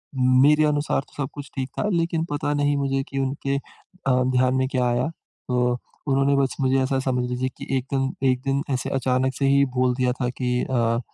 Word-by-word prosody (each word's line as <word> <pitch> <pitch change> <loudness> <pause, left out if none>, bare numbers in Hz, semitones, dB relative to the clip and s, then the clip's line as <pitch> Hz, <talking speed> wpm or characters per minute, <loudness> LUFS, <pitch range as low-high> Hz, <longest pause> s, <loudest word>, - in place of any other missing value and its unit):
मेरे 130 +4 +5
अनुसार 145 -2 +1
तो - - -25
सब 135 - -4
कुछ 145 -2 -8
ठीक 130 -1 -3
था 210 - 0
लेकिन 165 -1 0
पता 145 0 -1
नहीं 145 0 +1
मुझे 135 -1 0
की 135 - -3
उनके 135 +1 -1
अ, - - -5 0.5
ध्यान 130 0 +2
में 130 0 +1
क्या 125 -1 +1
आया, 120 +4 +1 0.4
तो 125 -1 +1 0.3
उन्होंने 135 +1 +3
बस 135 -1 +1
मुझे 130 0 +3
ऐसा 135 0 0
समझ 125 -2 0
लीजिए 125 +1 -1
कि - - -8
एक 130 - -3
दिन, 135 0 +1
एक 130 -1 +2
दिन 135 +1 0
ऐसे 130 - -1
अचानक 130 +1 +1
से 135 - -1
ही 140 0 +5
बोल 125 0 +2
दिया 125 -1 +1
था 125 - +1
की 125 0 -1
अ, 115 -2 +1
130 Hz, 210 wpm, -24 LUFS, 125-140 Hz, 0.5 s, मेरे